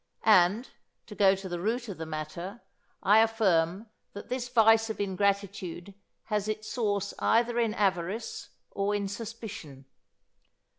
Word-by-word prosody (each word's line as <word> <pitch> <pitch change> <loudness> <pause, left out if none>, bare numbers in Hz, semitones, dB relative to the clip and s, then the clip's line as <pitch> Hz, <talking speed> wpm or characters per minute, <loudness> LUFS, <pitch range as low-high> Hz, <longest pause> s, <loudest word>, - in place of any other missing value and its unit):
And, 210 +3 +5 0.4
to 210 - -10
go 195 -2 +4
to 190 0 -7
the 175 -1 -4
root 235 +6 -1
of 195 -6 -7
the 160 - -5
matter, 165 +7 -6 0.4
I 210 +3 +6
affirm 200 -4 +2 0.3
that 205 - -9
this 250 0 -3
vice 225 -2 +5
of 220 - -5
ingratitude 200 -2 -2 0.3
has 210 -1 -2
its 215 0 -3
source 205 -4 -1
either 240 +1 +2
in 225 -2 +1
avarice 195 +1 -2 0.2
or 200 +1 -1
in 200 -1 -1
suspicion. 205 - -8
205 Hz, 140 wpm, -29 LUFS, 185-225 Hz, 0.4 s, I